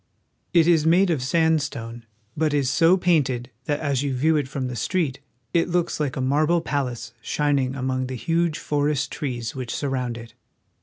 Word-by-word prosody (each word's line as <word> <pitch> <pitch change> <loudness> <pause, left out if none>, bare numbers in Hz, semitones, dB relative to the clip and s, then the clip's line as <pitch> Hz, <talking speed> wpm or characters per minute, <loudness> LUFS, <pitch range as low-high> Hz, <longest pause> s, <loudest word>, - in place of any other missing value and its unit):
It 170 -2 +4
is 165 -3 +4
made 175 +3 +4
of 155 -6 0
sandstone, 135 -6 0 0.3
but 155 -1 +1
is 140 -2 +1
so 165 +6 +5
painted 135 -9 +1
that 145 +1 -1
as 140 -4 0
you 140 -2 -1
view 155 +5 +2
it 145 -3 0
from 135 0 -4
the 125 - -5
street 140 - -1 0.3
it 170 0 +2
looks 175 -2 0
Hke 145 -4 -1
a - - -1
marble 150 +6 +2
palace 135 -7 -3
shining 140 -3 0
among 130 -1 -2
the 130 - -5
huge 165 +4 0
forest 145 -1 -1
trees 120 -6 -4
which 130 -3 -5
surround 130 -4 -2
it. 115 0 -11
145 Hz, 175 wpm, -24 LUFS, 130-160 Hz, 0.3 s, so